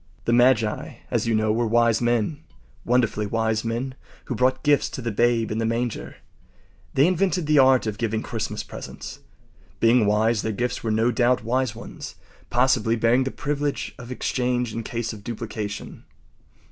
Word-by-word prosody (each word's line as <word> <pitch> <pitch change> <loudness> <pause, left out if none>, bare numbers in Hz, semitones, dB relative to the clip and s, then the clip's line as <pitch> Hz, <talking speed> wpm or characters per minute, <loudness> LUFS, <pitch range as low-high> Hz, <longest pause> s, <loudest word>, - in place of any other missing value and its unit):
” 65 - -31
The 120 - +2
magi, 120 -3 +2 0.2
as - - 0
you 115 - +2
know, 110 0 +2
were 115 +1 +1
wise 115 0 +3
men—wonderfully 120 -2 -1
wise 110 0 0
men—who 125 +3 -5
brought 125 +3 +1
gifts 145 -1 +3
to - - -7
the 120 -2 -2
Babe 115 +1 +2
in 110 - -1
the - - 0
manger. 115 0 -3 0.8
They 135 - +5
invented 185 -1 +1
the 150 -1 +4
art 130 -2 +5
of 105 -2 -4
giving 110 -1 -1
Christmas 115 -3 -4
presents. - - -9 0.6
Being 115 -1 +4
wise, 110 +1 +2
their 110 - -2
gifts 120 +4 -2
were 115 - -1
no 110 +3 +2
doubt 120 +1 +2
wise 130 +3 0
ones, - - -9 0.3
possibly 120 -2 +2
bearing 115 +3 +3
the - - -1
privilege 145 +1 -3
of 125 0 -9
exchange 125 -2 -1
in 115 - -3
case 115 0 -4
of 105 -2 -11
duplication. 110 -3 -6
120 Hz, 165 wpm, -24 LUFS, 110-125 Hz, 0.8 s, They